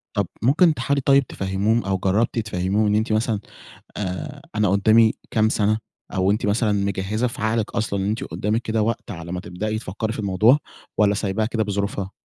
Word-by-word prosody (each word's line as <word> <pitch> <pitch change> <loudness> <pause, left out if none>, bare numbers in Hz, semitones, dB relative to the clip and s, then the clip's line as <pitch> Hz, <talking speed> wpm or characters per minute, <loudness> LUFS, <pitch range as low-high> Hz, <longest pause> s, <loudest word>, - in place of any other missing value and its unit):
طَب 100 -3 +1 0.2
ممكن 155 +6 +5
تحاولي 140 -1 0
طيب 140 -1 +4
تفهّميهم 100 +4 0
أو 95 -1 0
جرّبتِ 100 +6 +1
تفهّميهم 105 0 0
إن 105 - +2
أنتِ 110 +1 0
مثلًا 110 -1 +1 0.6
آآ، 140 - -5
أنا 105 -2 +3
قُدّامي 110 +3 +4 0.2
كام 110 -1 +3
سَنة 110 0 +1 0.4
أو 95 +1 +2
أنتِ 105 0 0
مثلًا 105 +1 +2
مجهِّزة 100 +3 -1
في 120 -3 -5
عقلِك 110 -1 0
أصلًا 100 -2 -1
أن 95 - -1
أنتِ 110 +6 -2
قُدّامِك 110 +3 -2
كده 110 -1 0
وقت 115 +1 -2
على 85 -2 -7
ما 90 - -3
تبدئي 105 +5 -3
تفكّري 110 +1 -4
في - - -7
الموضوع 105 +6 +4 0.4
والّا 105 -1 +4
سايباها 100 +1 -1
كده 110 -1 -1
بظروفها؟ 100 -1 -2
105 Hz, 185 wpm, -22 LUFS, 100-115 Hz, 0.6 s, ممكن